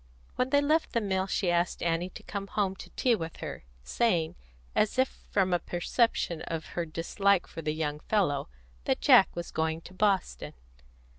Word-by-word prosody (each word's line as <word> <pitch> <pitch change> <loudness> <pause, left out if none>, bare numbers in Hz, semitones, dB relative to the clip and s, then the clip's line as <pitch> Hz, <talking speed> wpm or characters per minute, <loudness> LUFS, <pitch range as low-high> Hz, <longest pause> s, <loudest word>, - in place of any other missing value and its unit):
When 255 - 0
they 285 +1 +4
left 310 +3 +1
the 235 - +3
mill 190 -3 -1
she 190 -2 0
asked 175 +1 0
Annie 170 +1 0
to - - -11
come 200 -1 -5
home 195 -2 0
to - - -10
tea 250 - +3
with 165 -7 -3
her, - - -7 0.2
saying, 170 - +1 0.4
as 215 +2 +1
if 260 0 +3 0.2
from 190 -3 +2
a 175 - +3
perception 175 -2 0
of 160 -1 -4
her 170 -1 -2
dislike 175 +4 +1
for 165 - -8
the 155 -1 -1
young 150 -2 -2
fellow, 150 - 0 0.4
that - - +1
Jack - - +7
was 170 0 -5
going 160 0 -1
to 180 - -13
Boston. 195 -1 0
180 Hz, 180 wpm, -29 LUFS, 165-210 Hz, 0.4 s, Jack